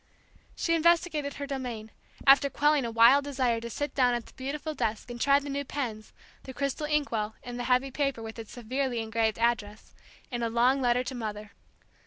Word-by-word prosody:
She 335 - 0
investigated 330 -3 +2
her 285 - -5
domain, 245 -6 -5 0.3
after 275 +1 +6
quelling 295 -1 +2
a 230 - -3
wild 235 +5 +6
desire 255 -5 0
to 235 - -6
sit 290 +5 -4
down 250 -2 +3
at 240 - -4
the - - -17
beautiful 295 +4 -4
desk 225 -3 -3
and 240 -1 -7
try 280 0 +5
the 285 0 -4
new 280 0 -2
pens, 235 -6 -5 0.3
the 260 - -10
crystal 280 +2 -2
ink 300 -1 0
well, 215 -1 -2
and 245 0 -6
the 245 - -3
heavy 255 +2 +2
paper, 275 -4 -1
with 225 +1 -8
its 225 - -9
severely 250 +1 -2
engraved 225 0 0
address, 225 -2 -1 0.4
in 240 -1 -3
a 230 - 0
long 245 +4 +3
letter 245 0 +2
to 255 - -5
Mother. 215 -3 -5
250 Hz, 200 wpm, -28 LUFS, 230-280 Hz, 0.4 s, after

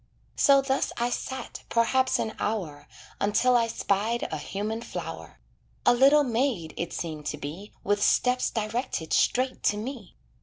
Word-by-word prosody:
So 275 -2 +5
thus 270 0 0
I 240 +1 0
sat, 260 +2 -5
perhaps 260 +3 +2
an 220 - -2
hour, 165 -10 -3 0.3
Until 225 +5 +3
I 230 -1 +3
spied 225 +2 0
a 155 - -3
human 210 +7 -4
flower; - - -7 0.5
A 245 - +6
little 275 +4 +6
maid 235 - -1
it 170 - -4
seemed 155 -3 -5
to 150 - -3
be 160 +8 -7
With 205 +1 +1
steps 250 +4 +3
directed 220 - -3
straight 255 +1 +2
to 205 - +2
me. 225 -3 -7
225 Hz, 150 wpm, -27 LUFS, 195-255 Hz, 0.5 s, A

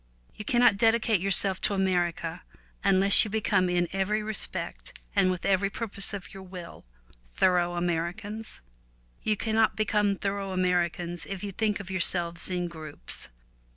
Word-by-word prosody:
You - - -8
cannot 240 -2 +3
dedicate 225 -2 +2
yourself 195 0 +2
to 205 - +1
America 175 -3 -1 0.4
unless 195 0 +7
you 215 - -4
become 200 -3 +1
in 175 0 +1
every 205 +3 0
respect 215 -1 -4 0.2
and 195 -2 +4
with 180 -1 -3
every 195 0 +2
purpose 200 -2 -4
of 200 0 -7
your 195 - -9
will 180 - -10 0.5
thorough 175 -1 +2
Ameri 175 +1 -1
cans. 220 - -8 0.6
You 215 -1 0
cannot 220 -1 +1
become 210 -1 +1
thorough 195 -1 -3
Ameri 180 -2 +2
cans 175 -1 -6
if 195 -1 -6
you 200 - -4
think 210 +1 -1
of 190 -1 -8
yourselves 170 -2 +1
in 180 -1 -2
groups. 155 - -5
190 Hz, 155 wpm, -27 LUFS, 175-205 Hz, 0.6 s, unless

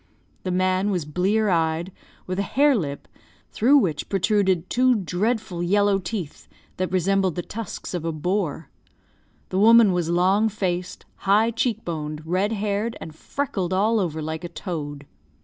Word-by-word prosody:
The 185 - -4
man 185 +2 +1
was 180 -6 -1
blear 195 +7 +1
eyed, 165 +1 0 0.3
with 185 +1 -3
a 200 - -3
hare 285 0 +5
lip, 145 -9 -4 0.4
through 265 +6 +4
which 165 - 0
protruded 190 -3 +1
two 255 0 +3
dreadful 195 0 -1
yellow 200 +2 +2
teeth 180 -4 -6 0.3
that 185 0 -2
resembled 190 0 +1
the 175 - -3
tusks 225 0 -7
of 175 -3 -3
a 165 - -1
boar. 165 -1 -2 0.8
The 185 - -1
woman 225 -1 +7
was 175 -2 -1
long 190 +5 +3
faced, 180 -3 -3
high 210 +4 +3
cheek 230 -1 -1
boned, 155 -2 -5
red 185 +5 0
haired, 210 +1 -2
and 160 - -8
freckled 190 - -3
all 215 +4 +2
over 160 -5 -2
like 160 +2 -4
a 175 - -5
toad. 145 -6 -6
185 Hz, 155 wpm, -24 LUFS, 170-210 Hz, 0.8 s, woman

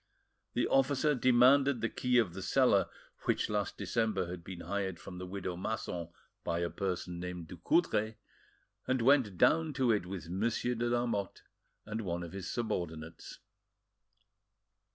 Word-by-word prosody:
The - - +1
officer 140 +2 +3
demanded 130 +1 +5
the 115 - 0
key 125 +1 +1
of 105 -8 +2
the 95 - -6
cellar 105 -1 +3 0.4
which - - +1
last 105 -1 -1
December 110 -5 0
had 90 -1 -7
been 90 0 -8
hired 100 -3 -2
from 90 -2 -9
the 90 - -6
widow 95 -1 -4
Masson 90 -3 -4 0.3
by 85 - -1
a 85 - -1
person 90 -2 -3
named 90 -2 -5
Ducoudray, 110 - +1 0.7
and 130 -2 +1
went 125 -8 +4
down 160 - +4
to 130 -3 +2
it 105 -5 0
with 90 -3 -6
Monsieur 115 +7 0
de 120 0 -1
Lamotte 120 -5 -1 0.4
and 110 +1 -3
one 85 -3 -3
of 85 - -7
his 95 0 -5
subordinates. 85 -8 -4
105 Hz, 150 wpm, -32 LUFS, 90-125 Hz, 0.7 s, demanded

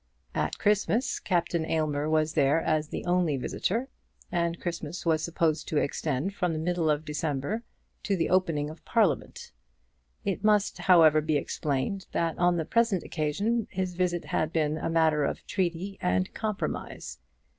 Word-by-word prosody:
At - - -1
Christmas, 210 +4 +1
Captain 170 -2 0
Aylmer 155 -2 0
was 155 0 +2
there 145 0 +3
as 155 -1 0
the - - -5
only 175 -5 +2
visitor, 225 - -1 0.4
and 170 -1 0
Christmas 170 -1 -5
was 160 -2 +2
supposed 160 -2 0
to 155 - -1
extend 145 +5 -1
from 180 -4 -1
the - - -2
middle 165 0 0
of 150 +1 +1
December 150 +6 -2 0.4
to 200 - 0
the 165 - +1
opening 165 -5 +1
of 160 - -14
Parliament. 200 - 0 0.7
It 200 0 -1
must, 210 -1 +3
however, 160 -4 +6
be 155 0 +1
explained, 145 +7 -2
that 165 -1 0
on 175 0 +3
the 160 - -1
present 230 -4 +2
occasion 200 +9 -1
his 185 -1 -2
visit 175 -1 -1
had 155 0 -1
been 155 -1 0
a - - -2
matter 160 -2 +3
of - - -2
treaty 185 +1 -2
and 90 +1 0
compromise. 215 - -4
165 Hz, 155 wpm, -28 LUFS, 155-185 Hz, 0.7 s, however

